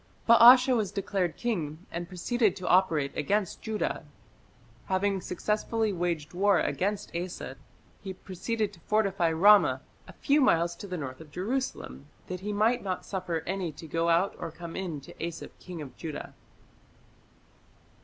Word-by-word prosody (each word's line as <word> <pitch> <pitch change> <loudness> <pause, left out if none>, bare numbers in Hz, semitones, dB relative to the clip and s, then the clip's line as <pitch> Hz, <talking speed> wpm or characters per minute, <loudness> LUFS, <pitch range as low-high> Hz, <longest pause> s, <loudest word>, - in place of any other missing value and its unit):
Baasha 250 +2 +8
was 210 -5 0
declared 195 -4 -2
king, 170 -8 -3
and 170 +1 -4
proceeded 205 +4 0
to 180 - -6
operate 165 -7 +3
against 195 +5 -1
Judah. 220 -5 -2 0.8
Having 195 0 0
successfully 215 +4 -1
waged 170 -4 -2
war 195 +1 +3
against 200 -1 -2
Asa, 175 -6 -5 0.5
he 195 - -6
proceeded 200 +3 -3
to 170 - -15
fortify 195 -3 +1
Ramah, 200 +6 +6 0.3
a - - -11
few 290 +1 +2
miles 170 -8 +3
to 205 - -8
the 180 -1 -4
north 135 -2 -6
of 160 - -12
Jerusalem, 195 - -4 0.2
"that 185 0 -5
he 205 +3 -4
might 220 +4 +2
not 185 -2 -4
suffer 180 -4 -3
any 185 -2 -2
to 155 - -11
go 165 +2 0
out 170 +4 +3
or - - -4
come 165 +1 -9
in 170 -7 -4
to - - -12
Asa 170 - -7
king 175 -4 -7
of 130 -3 -11
Judah". 155 -3 -7
185 Hz, 155 wpm, -28 LUFS, 170-210 Hz, 0.8 s, Baasha